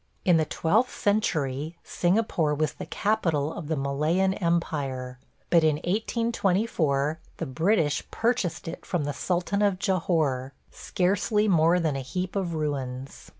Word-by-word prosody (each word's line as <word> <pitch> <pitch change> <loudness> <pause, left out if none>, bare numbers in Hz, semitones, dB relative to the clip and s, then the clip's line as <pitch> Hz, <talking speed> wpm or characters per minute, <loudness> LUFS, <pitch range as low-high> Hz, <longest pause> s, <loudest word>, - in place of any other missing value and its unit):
In 175 -3 +5
the 160 - +2
twelfth 215 +12 +1
century 160 - 0
Singapore 175 -5 +1
was 155 0 0
the - - -8
capital 165 -8 0
of 160 - -7
the 160 - 0
Malayan 155 +7 +1
empire, 140 -8 -2 0.3
but 170 -2 +5
in 155 -2 +4
1824 185 - 0 0.2
the 165 - -3
British 160 +1 +1
purchased 225 -9 -1
it 165 - -6
from 175 -5 -1
the 145 0 -2
sultan 185 +5 -1
of 200 -2 +2
Jahore, 160 -9 0 0.2
scarcely 205 +3 0
more 170 -1 +4
than 160 -4 0
a 135 - -2
heap 180 +9 -4
of 180 -4 -1
ruins. 135 -4 -4
165 Hz, 140 wpm, -26 LUFS, 145-190 Hz, 0.3 s, In